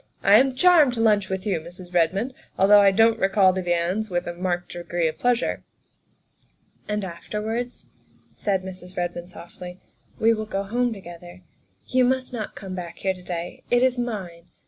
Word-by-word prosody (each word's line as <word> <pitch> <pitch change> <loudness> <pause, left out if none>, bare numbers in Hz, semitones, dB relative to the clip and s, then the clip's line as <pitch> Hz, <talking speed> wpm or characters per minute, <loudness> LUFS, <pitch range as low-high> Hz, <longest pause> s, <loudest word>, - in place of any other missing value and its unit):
" - - -34
I 210 - +9
am 265 0 +2
charmed 310 -5 +5
to - - -4
lunch 210 -4 +3
with 190 +1 -3
you, 195 -6 0
Mrs. 175 +2 -12
Redmond, 195 +9 +1 0.2
although 205 +2 +7
I 200 - +6
don 225 +4 +4
't 225 - -14
recall 195 -1 +4
the 185 - -2
viands 175 +4 -1
with 175 -1 -1
a 175 - -4
marked 175 0 -3
degree 175 -1 -2
of 155 - -5
pleasure." 245 -1 0 1.2
"And 210 -1 -2
afterwards," 215 +7 -5 0.4
said 195 -3 -1
Mrs. 185 -1 -10
Redmond 175 0 -3
softly, 180 0 -11 0.2
" - - -33
we 225 +1 +4
will 215 -1 -4
go 195 -2 -2
home 240 +4 0
together; 175 -2 -10 0.4
you 255 0 +2
must 255 0 0
not 220 -3 -5
come 190 -2 -7
back 175 -2 -7
here 190 - 0
to 185 - -14
day 175 -1 -6
it 245 +1 +3
is 255 -1 +2
mine. 190 -8 -5
195 Hz, 190 wpm, -24 LUFS, 175-225 Hz, 1.2 s, I